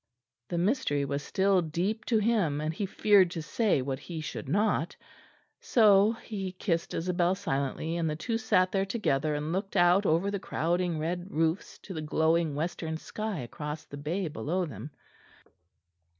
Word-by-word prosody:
The 175 Hz, -, -2 dB
mystery 175 Hz, -, +1 dB
was 140 Hz, +1 st, -2 dB
still 190 Hz, +2 st, +2 dB
deep 180 Hz, +7 st, -2 dB
to 230 Hz, -, +2 dB
him; 205 Hz, -9 st, +1 dB
and 155 Hz, +1 st, -2 dB
he 195 Hz, +4 st, -3 dB
feared 195 Hz, -2 st, +4 dB
to 170 Hz, -2 st, -5 dB
say 200 Hz, -, +1 dB
what 135 Hz, 0 st, -3 dB
he 170 Hz, -3 st, -7 dB
should 130 Hz, -6 st, -6 dB
not; 205 Hz, +6 st, +1 dB, 0.6 s
so 210 Hz, -2 st, +5 dB
he 195 Hz, -4 st, -5 dB
kissed 170 Hz, -3 st, -2 dB
Isabel 175 Hz, +1 st, +1 dB
silently; 160 Hz, -2 st, -2 dB
and 165 Hz, -2 st, 0 dB
the 150 Hz, -, -2 dB
two 225 Hz, +9 st, -2 dB
sat 185 Hz, -4 st, +2 dB
there 195 Hz, -1 st, +1 dB
together 155 Hz, -, 0 dB
and 150 Hz, +3 st, -2 dB
looked 195 Hz, +2 st, -3 dB
out 180 Hz, +3 st, +5 dB
over 170 Hz, +6 st, +2 dB
the 200 Hz, -, -2 dB
crowding 175 Hz, 0 st, -1 dB
red 175 Hz, +4 st, -3 dB
roofs 165 Hz, +1 st, -1 dB
to 195 Hz, -, -7 dB
the 160 Hz, -, -4 dB
glowing 160 Hz, 0 st, +1 dB
western 160 Hz, +1 st, -3 dB
sky 215 Hz, 0 st, -4 dB
across 150 Hz, +5 st, -6 dB
the -, -, -10 dB
bay 165 Hz, +6 st, -2 dB
below 160 Hz, +7 st, -2 dB
them. 150 Hz, -1 st, -8 dB
175 Hz, 165 wpm, -29 LUFS, 155-195 Hz, 0.6 s, so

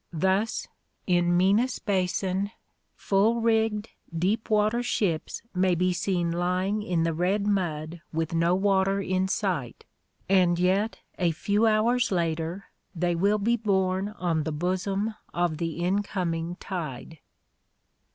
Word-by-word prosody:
Thus 190 Hz, +6 st, 0 dB, 0.4 s
in 175 Hz, -1 st, +2 dB
Minas 210 Hz, +7 st, +3 dB
Basin, 190 Hz, 0 st, -1 dB, 0.5 s
full 210 Hz, +4 st, +2 dB
rigged 225 Hz, -1 st, +1 dB, 0.3 s
deep 200 Hz, +7 st, 0 dB
water 215 Hz, +2 st, +2 dB
ships 185 Hz, -9 st, -1 dB
may 185 Hz, -1 st, +2 dB
be 180 Hz, +1 st, +1 dB
seen 175 Hz, -1 st, 0 dB
lying 180 Hz, +4 st, 0 dB
in 175 Hz, -5 st, 0 dB
the 165 Hz, 0 st, 0 dB
red 190 Hz, +5 st, 0 dB
mud 170 Hz, -5 st, -1 dB
with 160 Hz, 0 st, -2 dB
no 170 Hz, +2 st, +3 dB
water 195 Hz, 0 st, +2 dB
in 185 Hz, -1 st, 0 dB
sight, 185 Hz, -, -2 dB, 0.4 s
and 180 Hz, -3 st, +4 dB
yet 190 Hz, +5 st, +1 dB, 0.2 s
a 175 Hz, -2 st, +3 dB
few 205 Hz, +7 st, +1 dB
hours 230 Hz, +3 st, +2 dB
later 170 Hz, +1 st, -1 dB, 0.3 s
they 175 Hz, +1 st, +1 dB
will 200 Hz, +5 st, +2 dB
be 230 Hz, +4 st, +1 dB
borne 190 Hz, -2 st, 0 dB
on 170 Hz, -3 st, 0 dB
the 160 Hz, -, -3 dB
bosom 185 Hz, +6 st, -1 dB, 0.2 s
of 175 Hz, -2 st, 0 dB
the 165 Hz, -1 st, -2 dB
incoming 175 Hz, -3 st, -1 dB
tide. 160 Hz, -5 st, -6 dB
185 Hz, 130 wpm, -27 LUFS, 175-205 Hz, 0.5 s, and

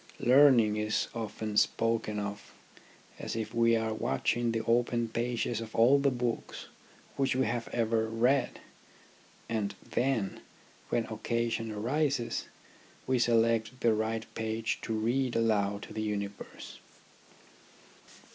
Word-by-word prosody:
Learning 125 Hz, -5 st, +5 dB
is 110 Hz, +1 st, 0 dB
often 110 Hz, -1 st, -4 dB
spoken 115 Hz, -2 st, +1 dB
of 100 Hz, 0 st, -6 dB, 0.6 s
as -, -, -4 dB
if 110 Hz, -1 st, -4 dB
we 115 Hz, 0 st, +4 dB
are 110 Hz, -1 st, 0 dB
watching 110 Hz, -, 0 dB
the 115 Hz, -1 st, -2 dB
open 120 Hz, 0 st, +2 dB
pages 120 Hz, 0 st, -2 dB
of 110 Hz, -1 st, -8 dB
all 125 Hz, +5 st, +6 dB
the 140 Hz, 0 st, +3 dB
books 120 Hz, -2 st, -3 dB, 0.5 s
which 135 Hz, -2 st, +1 dB
we 130 Hz, -, +2 dB
have 115 Hz, +1 st, -2 dB
ever 110 Hz, -1 st, 0 dB
read, 120 Hz, +4 st, +1 dB, 0.9 s
and 105 Hz, -3 st, -2 dB
then, 120 Hz, -6 st, -1 dB, 0.5 s
when 115 Hz, -, 0 dB
occasion 115 Hz, +1 st, -2 dB
arises, 130 Hz, +4 st, -1 dB, 0.6 s
we 130 Hz, -1 st, +1 dB
select 115 Hz, +1 st, +2 dB
the 115 Hz, -2 st, +4 dB
right 110 Hz, +1 st, -1 dB
page 110 Hz, 0 st, -2 dB
to -, -, -5 dB
read 120 Hz, +4 st, 0 dB
aloud 105 Hz, -3 st, +1 dB
to -, -, -10 dB
the 110 Hz, -, -3 dB
universe. 100 Hz, -1 st, -5 dB
115 Hz, 125 wpm, -30 LUFS, 110-120 Hz, 0.9 s, all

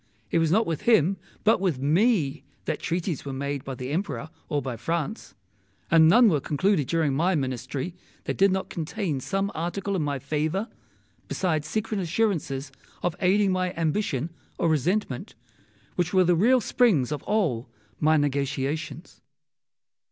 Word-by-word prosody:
It -, -, +3 dB
was 165 Hz, -1 st, +2 dB
not 220 Hz, +5 st, +4 dB
with 165 Hz, -3 st, -2 dB
him, 195 Hz, -3 st, +4 dB, 0.3 s
but 220 Hz, -1 st, +4 dB
with 180 Hz, -8 st, +1 dB
me, 155 Hz, -, +2 dB, 0.2 s
that -, -, -2 dB
treaties 170 Hz, -1 st, -2 dB
were 140 Hz, -, -5 dB
made 140 Hz, 0 st, -3 dB
by 135 Hz, -, -5 dB
the 125 Hz, +2 st, -5 dB
Emperor 155 Hz, -, -3 dB, 0.2 s
or 145 Hz, -, +1 dB
by 130 Hz, -3 st, -4 dB
France; 165 Hz, -, -3 dB, 0.6 s
and 160 Hz, -1 st, +7 dB
none 235 Hz, +7 st, +7 dB
were 160 Hz, -8 st, +3 dB
concluded 150 Hz, 0 st, +1 dB
during 160 Hz, -3 st, +1 dB
my 170 Hz, +6 st, +2 dB
Ministry 135 Hz, +3 st, -3 dB, 0.3 s
that -, -, -2 dB
did 195 Hz, 0 st, +4 dB
not 190 Hz, 0 st, -1 dB
contain 165 Hz, -2 st, -2 dB
some 195 Hz, +8 st, -1 dB
Article 185 Hz, +4 st, -2 dB
in 180 Hz, -, 0 dB
my 145 Hz, -2 st, -1 dB
favour, 155 Hz, -, -2 dB, 0.6 s
besides 155 Hz, -5 st, -1 dB
secret 215 Hz, +1 st, -2 dB
assurances 165 Hz, -8 st, -1 dB, 0.3 s
of 175 Hz, -2 st, 0 dB
aiding 195 Hz, +1 st, +3 dB
my 185 Hz, -1 st, -1 dB
ambition 165 Hz, -3 st, -1 dB, 0.3 s
or 170 Hz, -, +1 dB
resentment, 155 Hz, -, -1 dB, 0.6 s
which 180 Hz, +1 st, 0 dB
were 185 Hz, -, +6 dB
the 175 Hz, 0 st, +3 dB
real 240 Hz, +8 st, +4 dB
springs 195 Hz, -, +2 dB
of 150 Hz, -2 st, -2 dB
all 155 Hz, -, 0 dB, 0.3 s
my 155 Hz, +1 st, +4 dB
negotiations. 145 Hz, +3 st, -2 dB
165 Hz, 155 wpm, -26 LUFS, 145-195 Hz, 0.6 s, and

